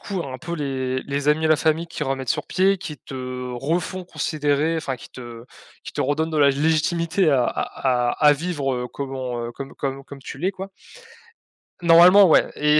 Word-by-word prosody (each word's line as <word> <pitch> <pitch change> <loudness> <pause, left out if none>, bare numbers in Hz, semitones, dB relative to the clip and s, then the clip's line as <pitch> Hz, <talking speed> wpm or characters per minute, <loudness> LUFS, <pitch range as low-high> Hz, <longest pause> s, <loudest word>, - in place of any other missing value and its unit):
coup 195 -3 -4
un 130 -2 -6
peu 165 +5 -6
les 130 -3 -2
les 140 +1 -2
amis 155 +1 +2
et - - +3
la 155 - +6
famille 160 +2 0
qui 165 - -6
remettent 135 -2 -3
sur - - -2
pied 195 +1 +2
qui 165 -5 -7
te 135 - -11 0.4
refont 170 +8 -2
considérer 155 -1 -1
enfin 135 -5 -3
qui 115 - -13
te 120 -2 -10 0.4
qui - - -8
te - - -4
redonnent 155 +4 0
de 155 - -3
la 145 -2 +5
légitimité 160 +4 +1
à 130 -4 +3
à 125 0 -1
à 150 - +1
à 150 - +8
vivre, 145 -3 -2
heu, 125 0 -3
comment, 130 -3 -4
heu, 120 - -7
comme 140 +2 -8
comme 135 -1 -4
comme 140 0 -11
tu 135 - -9
l'es 180 +6 0
quoi. 190 0 -8 1.1
Normalement, 175 +4 +8
ouais, 160 - +4
et 150 0 +3
150 Hz, 200 wpm, -22 LUFS, 135-165 Hz, 1.1 s, à